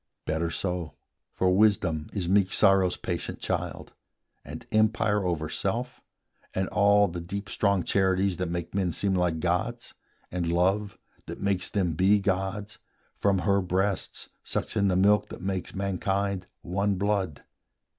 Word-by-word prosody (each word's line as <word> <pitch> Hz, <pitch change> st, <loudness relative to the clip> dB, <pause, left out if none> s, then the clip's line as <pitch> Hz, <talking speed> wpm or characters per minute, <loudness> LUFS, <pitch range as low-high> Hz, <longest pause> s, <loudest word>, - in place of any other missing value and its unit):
Better 80 Hz, +2 st, -1 dB
so: 90 Hz, -3 st, -3 dB, 0.4 s
For 90 Hz, 0 st, +2 dB
wisdom 95 Hz, -7 st, +2 dB
is 95 Hz, -4 st, -2 dB
meek 95 Hz, 0 st, +3 dB
sorrow's 95 Hz, -2 st, +4 dB
patient -, -, -4 dB
child, -, -, -3 dB, 0.5 s
And -, -, -9 dB
empire 110 Hz, -1 st, +2 dB
over 85 Hz, -4 st, -1 dB
self, 120 Hz, +10 st, -3 dB, 0.5 s
and 95 Hz, 0 st, 0 dB
all 100 Hz, 0 st, +4 dB
the 85 Hz, 0 st, -5 dB
deep 100 Hz, +4 st, -5 dB
Strong 100 Hz, -4 st, +1 dB
charities 95 Hz, -1 st, +2 dB
that 90 Hz, -2 st, -2 dB
make 85 Hz, -1 st, -4 dB
men 95 Hz, -4 st, 0 dB
seem 100 Hz, -1 st, 0 dB
like 90 Hz, -3 st, +1 dB
gods; 110 Hz, +8 st, -2 dB, 0.4 s
And 85 Hz, -2 st, -1 dB
love, 95 Hz, +4 st, +1 dB, 0.3 s
that -, -, -7 dB
makes 100 Hz, -2 st, 0 dB
them 90 Hz, -5 st, 0 dB
be 95 Hz, +6 st, +4 dB
gods, 100 Hz, +3 st, -2 dB, 0.3 s
from 100 Hz, -1 st, +1 dB
her 100 Hz, -1 st, +3 dB
breasts 95 Hz, +2 st, -1 dB
Sucks -, -, -2 dB
in 100 Hz, -2 st, +2 dB
the 95 Hz, -, +2 dB
milk 105 Hz, +2 st, +4 dB
that -, -, -8 dB
makes 95 Hz, -1 st, -3 dB
mankind 100 Hz, 0 st, -1 dB, 0.2 s
one 100 Hz, +3 st, 0 dB
blood. 95 Hz, -5 st, -1 dB
95 Hz, 145 wpm, -27 LUFS, 90-100 Hz, 0.5 s, sorrow's